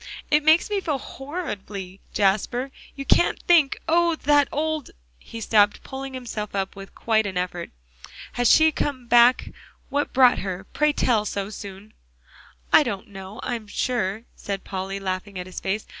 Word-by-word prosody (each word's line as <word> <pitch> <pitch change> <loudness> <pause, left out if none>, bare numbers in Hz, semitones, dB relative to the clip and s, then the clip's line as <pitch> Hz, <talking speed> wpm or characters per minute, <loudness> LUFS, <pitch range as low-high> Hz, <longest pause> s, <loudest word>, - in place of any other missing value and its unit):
"It 300 0 +4
makes 315 +6 +4
me 405 -1 0
feel 305 -6 -1
horridly, 210 - -7
Jasper 215 +6 +1 0.2
you 275 - -6
can't 345 - +3
think. 325 -6 +4
Oh! 340 0 +3
that 290 -1 +3
old" 310 -1 -2 0.3
He 230 - -9
stopped, 210 -2 +3
pulling 270 0 -7
himself 215 -5 -5
up 195 0 -2
with 195 0 -11
quite 220 -2 +1
an 190 -2 -4
effort. 180 -1 -3 0.6
"Has 245 -1 +2
she 315 0 +6
come 275 -4 -3
back 240 +1 +5 0.4
what 285 +1 -1
brought 255 -1 +5
her, 185 -1 -4
pray 300 0 +3
tell, 235 -6 +1
so 200 -1 -4
soon?" 200 +1 -10 0.8
"I - - +9
don't 195 +1 -4
know, 195 +1 -9
I - - -2
am 225 -3 -5
sure," 215 -2 -1
said 200 -1 -5
Polly, 195 +1 -4
laughing 190 +1 -4
at 180 - -5
his 185 - -7
face. 205 +3 -2
225 Hz, 165 wpm, -24 LUFS, 195-280 Hz, 0.8 s, I